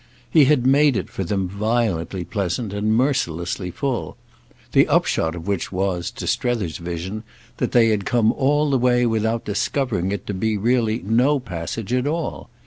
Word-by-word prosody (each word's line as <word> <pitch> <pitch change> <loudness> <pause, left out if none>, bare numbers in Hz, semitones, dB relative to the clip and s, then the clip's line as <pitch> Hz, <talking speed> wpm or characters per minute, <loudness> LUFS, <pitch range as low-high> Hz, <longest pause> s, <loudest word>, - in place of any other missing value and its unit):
He 155 -4 +6
had 130 -3 +3
made 140 -1 +4
it - - -4
for 95 - -3
them 95 +1 -1
violently 100 -3 -1
pleasant 100 +3 -3
and 105 +2 +1
mercilessly 90 - 0
full; 130 +5 -3 0.5
the - - +5
upshot 80 +1 +1
of 85 - -8
which 100 -4 -2
was, 90 -2 -1
to - - -7
Strether's 115 -10 -1
vision, 85 +5 -5 0.4
that - - -1
they 115 -2 +5
had 105 -2 +1
come 115 +1 +2
all 145 +2 +1
the 135 - +2
way 125 0 +3
without 110 0 0
discovering 105 -2 -1
it 100 -2 -4
to 105 - -3
be 110 +3 0
really 115 +1 +1
no 125 +7 +3
passage 105 +1 -5
at 125 +2 +1
all. 165 +2 -3
110 Hz, 170 wpm, -22 LUFS, 95-125 Hz, 0.5 s, He